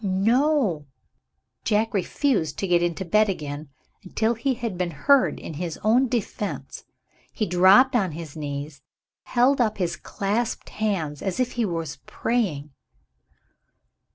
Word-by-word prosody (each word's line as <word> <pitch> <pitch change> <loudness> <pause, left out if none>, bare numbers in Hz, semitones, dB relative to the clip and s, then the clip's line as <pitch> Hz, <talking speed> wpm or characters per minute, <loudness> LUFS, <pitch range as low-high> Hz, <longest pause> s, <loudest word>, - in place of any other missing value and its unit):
No! 210 - +2 0.8
Jack 220 +1 +1
refused 195 - 0
to - - -2
get 175 -1 +3
into 175 +2 -1
bed 215 +4 +3
again, 150 -4 -5 0.3
until 220 +4 0
he 250 +3 -1
had 230 -4 -4
been 180 0 -1
heard 255 - +3
in - - -7
his 170 -3 -3
own 240 +5 +4
defense. 220 -3 -4 0.5
He 215 - -1
dropped 195 +9 +5
on 190 -8 +1
his 160 -2 -8
knees, 145 -1 -5
and - - -23
held 255 +2 +4
up 220 -3 +1
his 175 -3 -1
clasped 205 +8 -3
hands, 175 -9 -2
as 190 +1 -3
if 250 -1 +1
he 235 -2 -1
was 165 -6 -4
praying. 165 -12 -1
195 Hz, 140 wpm, -24 LUFS, 165-235 Hz, 0.8 s, dropped